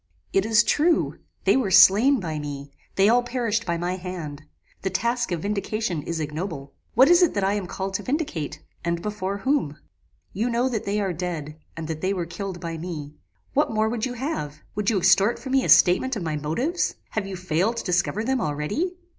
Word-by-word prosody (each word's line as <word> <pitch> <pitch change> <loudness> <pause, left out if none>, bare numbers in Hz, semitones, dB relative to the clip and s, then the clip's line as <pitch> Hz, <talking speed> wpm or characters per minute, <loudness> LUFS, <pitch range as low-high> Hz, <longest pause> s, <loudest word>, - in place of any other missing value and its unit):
"It 195 +2 +2
is 225 +1 +5
true, 325 +6 +2 0.2
they - - +4
were 255 -7 +1
slain 205 +8 +7
by 160 -5 -3
me; 140 -1 -6 0.2
they 195 +1 +4
all 240 +3 +5
perished 235 -3 -1
by 170 -1 0
my 175 +2 -2
hand. 175 -6 -6 0.4
The 190 - -1
task 235 +4 -1
of 170 -2 -2
vindication 205 -3 -2
is 165 +2 -4
ignoble. 150 -2 -5 0.2
What 260 +4 +7
is 350 +2 +6
it 350 -9 +3
that 200 - 0
I 195 +1 +2
am 205 -3 -2
called 190 +2 -4
to 195 - -1
vindicate? 250 - -3 0.2
and 170 0 -1
before 200 -2 -3
whom? 230 - 0 0.6
"You 225 +5 0
know 240 +2 +1
that 225 -4 -3
they 205 +1 0
are 195 -3 -1
dead, 160 -3 -5 0.2
and 160 -1 -5
that 160 -1 -4
they 190 +1 +1
were 175 -2 -2
killed 180 +2 -6
by 165 -1 -5
me. 155 -4 -6 0.4
What - - +2
more 220 0 +1
would 235 +1 -1
you 250 - -5
have? 230 - -4
Would 210 -1 0
you 220 - +2
extort 195 +4 +4
from 265 - -7
me 270 -1 +3
a - - -2
statement 240 +9 +5
of 200 - -4
my 155 -2 -2
motives? 235 - -1 0.2
Have 205 -3 -2
you 195 - -5
failed 185 +5 0
to - - -3
discover 180 +3 0
them 260 +1 0
already? 155 - -1
195 Hz, 210 wpm, -24 LUFS, 170-235 Hz, 0.6 s, slain